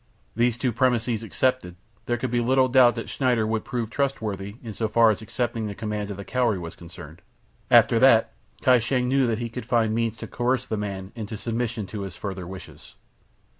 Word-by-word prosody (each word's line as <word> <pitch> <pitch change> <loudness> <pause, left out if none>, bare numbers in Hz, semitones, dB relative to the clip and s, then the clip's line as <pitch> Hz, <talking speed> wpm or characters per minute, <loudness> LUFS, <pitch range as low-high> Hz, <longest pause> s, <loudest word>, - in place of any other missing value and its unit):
These 120 +1 +2
two 125 0 0
premises 120 -2 +1
accepted 115 -4 -1 0.3
there 120 - 0
could 125 0 -3
be 120 - +1
little 130 +2 +3
doubt 125 -1 +5
that 115 - -5
Schneider 125 -5 +1
would 110 0 -1
prove 120 -4 -4
trustworthy 110 -7 -2
in 110 -2 -6
so 110 +2 -1
far 115 +1 +5
as 105 - -4
accepting 115 0 -2
the 100 - -6
command 105 -1 -4
of 100 - -6
the 100 - -7
Cowrie 120 -5 +1
was 85 -2 -7
concerned; 85 -1 -12 0.5
after 115 - +6
that 115 -3 +5 0.3
Kai 125 -1 +6
Shang 125 +2 0
knew 135 0 +2
that 115 -2 0
he 120 +1 -3
could 120 +2 -7
find 115 -3 +2
means 115 0 -1
to - - -7
coerce 125 +1 -1
the 110 - -3
man 100 -2 -5
into 110 -2 -6
submission 115 -1 -3
to 105 +2 -6
his 95 -2 -6
further 95 -3 -6
wishes. 95 0 -11
115 Hz, 205 wpm, -25 LUFS, 105-125 Hz, 0.5 s, after